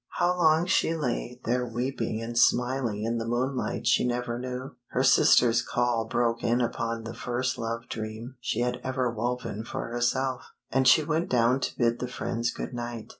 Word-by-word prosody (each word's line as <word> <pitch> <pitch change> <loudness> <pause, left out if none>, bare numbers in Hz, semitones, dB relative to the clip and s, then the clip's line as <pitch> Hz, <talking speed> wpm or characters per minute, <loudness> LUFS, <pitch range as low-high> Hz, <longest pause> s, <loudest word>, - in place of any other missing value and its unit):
How 175 +1 +2
long 160 -1 +4
she 170 -2 +2
lay 125 -4 -3
there 125 +2 +1
weeping 120 -2 -3
and 120 +1 -5
smiling 120 -3 +2
in 115 +1 -1
the 115 - -4
moonlight 125 +2 -1
she - - +4
never 120 -1 -1
knew. 130 +2 -6
Her 130 - 0
sister's 120 -3 +5
call 120 -2 0
broke 115 +1 0
in 120 +1 +2
upon 115 -1 -2
the 115 +1 -6
first 125 +1 -2
love 115 +1 -4
dream 110 +3 -6
she 120 -2 -2
had 125 0 -1
ever 130 -2 -1
woven 120 -1 -3
for 115 - -5
herself, 125 +2 -1 0.2
and 130 +2 +3
she 130 +5 +7
went 160 +2 -1
down 125 +1 +3
to - - -3
bid 120 -1 +2
the 125 - -3
friends 120 -1 -2
good - - -5
night. 120 -2 -5
120 Hz, 180 wpm, -27 LUFS, 115-130 Hz, 0.2 s, she